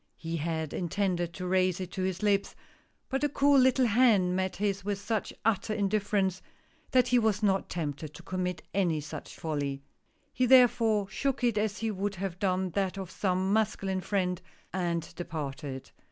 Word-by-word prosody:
He 165 0 -4
had 160 -1 -2
intended 175 -1 -1
to 180 - -5
raise 185 0 +2
it 185 -1 -5
to 190 - -4
his 185 +1 -2
lips, 200 -1 +1 0.5
but 270 0 -1
the 295 - +2
cool 280 0 +4
little 260 0 +4
hand 210 -6 +4
met 190 0 -1
his 200 -1 -1
with 200 0 -2
such 215 +1 -2
utter 215 0 +1
indifference 200 -2 0 0.5
that 255 -1 +3
he 245 0 +5
was 220 -2 +1
not 195 -2 +2
tempted 150 -2 -4
to - - -11
commit 180 -1 -3
any 175 -5 +1
such 150 0 -8
folly. 140 -3 -3 0.5
He 255 0 +2
therefore 230 -5 +5
shook 255 +6 -2
it 235 -3 +3
as 210 -1 -1
he 225 -1 -1
would 200 0 -2
have 185 -1 -4
done 185 -1 0
that 195 +1 -1
of 190 -2 -6
some 190 0 0
masculine 195 -3 0
friend, 180 -2 -1 0.3
and 170 -3 -2
departed. 145 -5 -6
190 Hz, 170 wpm, -29 LUFS, 175-210 Hz, 0.5 s, he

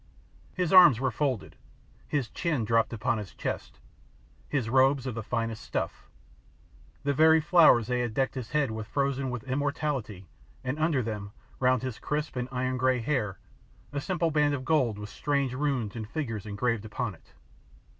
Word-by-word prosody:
His 180 -1 0
arms 175 -11 +9
were 130 0 0
folded, 130 -1 -2 0.5
his 140 -5 -1
chin 155 -9 -1
dropped 115 0 +2
upon 115 +1 -1
his 105 -3 -8
chest, - - -4 0.7
his 130 -6 0
robes 130 +2 +3
of 130 - -3
the 115 - -4
finest 115 0 -3
stuff, - - -4 1.0
the 140 0 +1
very 160 +3 +6
flowers 155 -8 +5
they 125 +2 -1
had 120 -3 -2
decked 135 -1 +1
his 125 -4 -6
head 150 -5 +1
with 110 -1 -5
frozen 140 -1 -1
with 125 -2 -4
immortality, 135 -7 -2 0.4
and 130 +4 -3
under 155 -5 +2
them, 105 -2 -5 0.3
round 130 -2 +2
his 130 -4 -4
crisp 150 -1 -3
and 125 0 -3
iron 130 0 -1
grey 130 0 +2
hair, 115 -7 -1 0.6
a 140 - -2
simple 170 -1 0
band 150 -1 +2
of 130 -2 -6
gold 130 -9 +2
with 105 0 -7
strange 140 -1 -1
runes 130 -6 -1
and 110 -2 -6
figures 115 -8 -4
engraved 110 +1 -1
upon 110 0 -3
it. - - -21
130 Hz, 170 wpm, -28 LUFS, 115-145 Hz, 1.0 s, arms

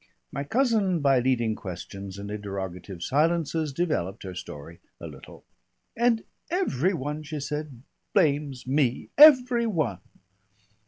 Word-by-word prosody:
My 140 - -3
cousin 215 - +1
by 135 -3 +4
leading 120 -3 +1
questions 95 0 -8
and 100 +1 -7
interrogative 95 -3 -6
silences 160 - +1
developed 130 - -2
her 95 -2 -6
story 80 0 -9 0.2
a - - -8
little. - - -12 0.5
"And 235 -1 +2 0.3
every 195 - +1
one," 150 +1 -4
she 155 0 -6
said, 145 -3 -5 0.3
"blames 145 -7 +1
me. 130 -2 0
Every 255 -5 +7
one." 155 - -1
145 Hz, 120 wpm, -26 LUFS, -, 0.5 s, Every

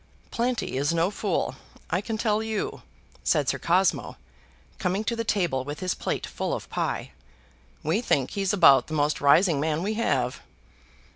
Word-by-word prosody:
"Planty 240 - -1
is 145 +3 +1
no 170 +4 +2
fool, 195 -9 -2 0.3
I 180 - +1
can 220 +1 -3
tell 215 -1 +1
you," 220 -1 -3 0.4
said - - +2
Sir - - 0
Cosmo, - - +1 0.6
coming 190 +2 0
to 235 - -1
the 230 - -2
table 175 - 0
with 145 +2 -6
his 185 -1 -1
plate - - -3
full - - -3
of - - -7
pie. - - -2 0.7
"We 165 +9 +1
think 135 - +1
he's 195 -2 0
about 135 -10 +6
the 155 - -4
most 150 0 +1
rising 150 +2 +5
man 155 +2 0
we 210 +3 -1
have." 230 +2 0
185 Hz, 165 wpm, -26 LUFS, 150-215 Hz, 0.7 s, about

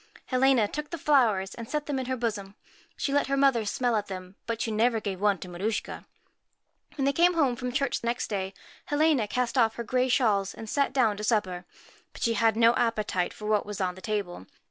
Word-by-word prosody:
Helena 255 -4 +3
took 300 +6 -5
the 335 - -5
flowers, 230 -11 +2
and 230 -1 -8
set 300 -1 -2
them 280 -3 -2
in 260 - -4
her 260 0 -1
bosom. 205 -4 -3 0.4
She 275 - -1
let 285 - +2
her 275 0 0
mother 270 -5 +3
smell 240 +2 0
at 210 -1 -1
them, 185 -1 -8
but 230 -1 -2
she 225 - -1
never 225 +2 +2
gave 200 -3 -5
one 205 -1 +3
to 180 - -9
Maruschka. 190 +5 -4 0.9
When 275 - 0
they 280 - +2
came 350 +2 +4
home 275 -7 +2
from 250 0 -4
church 275 0 -1
next 235 +1 -1
day, 195 -2 -3 0.3
Helena 290 -6 +2
cast 250 +3 -1
off 225 -2 +3
her 235 - -4
gay 255 +3 +1
shawls, 210 -6 +1
and 225 - -8
sat 280 +5 +1
down 235 -6 +2
to 210 - -6
supper. 190 -5 0 0.5
But - - -7
she 230 - +2
had 225 0 +2
no 230 0 +6
appetite 215 -7 0
for 210 - -10
what 210 -1 +2
was 205 -2 -7
on 185 -2 0
the 185 - -13
table. 195 - -4
230 Hz, 220 wpm, -27 LUFS, 205-260 Hz, 0.9 s, no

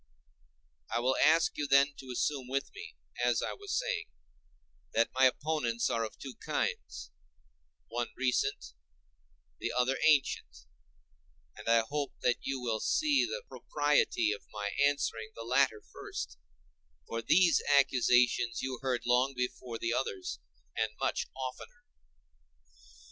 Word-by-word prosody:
I - - +1
will 130 +2 +1
ask 160 +2 +4
you 145 - -1
then 140 +1 +5
to 130 - -10
assume 130 +1 -1
with 135 +2 -2
me, 85 -1 -10 0.3
as 120 -2 +2
I - - -2
was 405 0 -4
saying, - - -2 0.9
that 115 +1 +2
my 130 +1 +4
opponents 130 -4 0
are 115 -1 0
of 110 - -6
two 135 -2 -8
kinds—one 65 - -5
recent, 130 - 0 0.9
the - - -2
other 125 +2 +1
ancient; 80 - +1 0.9
and - - -6
I 115 0 +6
hope 140 +4 -3
that 125 -1 +2
you 135 -1 -3
will 115 -3 -1
see 300 - +2
the 485 +5 -5
propriety 145 -7 +1
of 105 - -4
my 105 -1 -3
answering 115 -6 0
the 115 - -7
latter 125 -2 +2
first, 60 -1 -6 0.7
for 115 - -3
these 170 +5 +4 0.2
accusations 125 -3 +3
you 130 -2 -3
heard 130 -2 -1
long 125 +3 +2
before 125 -1 -3
the 115 +1 -1
others, 100 -8 -3 0.4
and 110 -1 +1
much - - -1
oftener. 130 - -7
125 Hz, 130 wpm, -31 LUFS, 115-140 Hz, 0.9 s, I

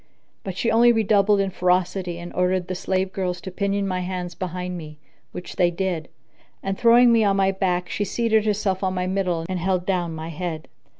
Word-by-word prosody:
But 190 -2 -5
she 230 - +1
only 235 +2 +6
redoubled 210 -2 +3
in 195 -1 0
ferocity 180 -1 0
and 175 0 -8
ordered 180 0 0
the 185 - -3
slave 190 +1 -1
girls 180 -2 -2
to 190 - -7
pinion 200 +1 -1
my 185 -1 -1
hands 180 -1 -4
behind 180 0 -4
me, 155 -3 -8 0.3
which 180 - -8
they 175 -2 +4
did; 175 -2 -3 0.5
and, 195 0 -1
throwing 240 +2 +6
me 230 -1 +4
on 200 -1 +3
my 195 0 +3
back, 180 -2 -1
she 205 - -2
seated 220 +1 +1
herself 200 -2 0
on 190 0 0
my 180 0 -1
middle 185 -3 -1
and 185 -1 -3
held 180 0 0
down 175 -4 -1
my 160 +1 -6
head. 165 -1 -5
185 Hz, 200 wpm, -23 LUFS, 180-195 Hz, 0.5 s, only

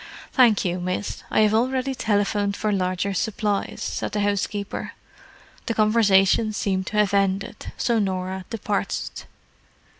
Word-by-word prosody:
"Thank 240 -7 +4
you, 180 0 -1
miss, 185 +3 -3
I - - +3
have 215 0 +4
already 260 +3 +1
telephoned 205 -3 0
for 215 - 0
larger 185 0 0
supplies," 205 0 -1
said - - -3
the 210 - 0
housekeeper. 205 0 -2 0.7
The 230 - -1
conversation 215 -1 +4
seemed 190 -2 -1
to 210 - -3
have 210 -2 +3
ended, 195 +1 -1
so 235 -2 +1
Norah 190 -1 -2
departed. 210 -3 -3
205 Hz, 130 wpm, -24 LUFS, 195-215 Hz, 0.7 s, Thank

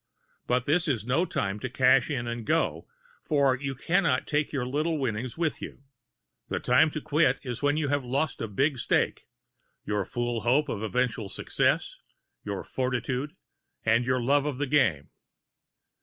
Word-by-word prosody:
But 125 0 +1
this 165 +4 +2
is 120 -8 0
no 140 +9 +1
time 100 -9 -2
to 130 - -4
"cash 130 +4 +4
in" 130 -6 -2
and 120 0 -4
go, - - 0 0.3
for 140 -3 +2
you 135 +1 -4
can 180 +8 +1
not - - +1
take 150 0 0
your 135 -4 -2
little 155 +5 -1
winning 125 -2 -2
with 160 -3 -1
you. - - -8 0.6
The - - -2
time 160 - +4
to 155 0 -5
quit 150 -3 +2
is 125 -4 -5
when 145 +1 +2
you 150 -3 0
have 145 -1 0
lost 140 +5 -1
a 115 - -2
big 135 +6 0
stake, - - 0 0.6
your 105 -1 0
fool 120 +3 -2
hope 130 +7 +2
of 105 - -3
eventual 115 -2 -1
success, - - 0 0.4
your 100 -2 -4
fortitude 130 +2 -2 0.5
and 115 +2 +3
your 130 +1 +1
love 140 +4 +2
of 145 -4 -3
the 145 - 0
game. 125 - +1
130 Hz, 170 wpm, -27 LUFS, 120-145 Hz, 0.6 s, cash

